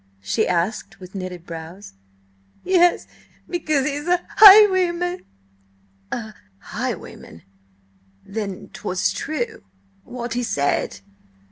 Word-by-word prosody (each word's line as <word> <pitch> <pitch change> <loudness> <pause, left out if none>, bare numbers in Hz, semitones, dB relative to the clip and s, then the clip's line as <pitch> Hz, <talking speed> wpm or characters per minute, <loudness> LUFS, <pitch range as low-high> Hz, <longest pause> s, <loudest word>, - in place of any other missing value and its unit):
she - - 0
asked, 190 +3 -2
with 185 -1 -12
knitted 185 -3 -7
brows. 165 - -9 0.7
"Yes. 355 -1 +3 0.4
Because 310 -6 -1
he's 295 +2 -3
a 355 0 +1
highwayman." 370 -4 +7 0.9
"A 220 -2 -5 0.2
highwayman! 85 -3 -7 0.8
Then 200 -2 -6
'twas 185 0 -1
true 430 +8 -4 0.4
what 240 0 -6
he 245 - -1
said? 145 - -1
240 Hz, 95 wpm, -21 LUFS, -, 0.9 s, highwayman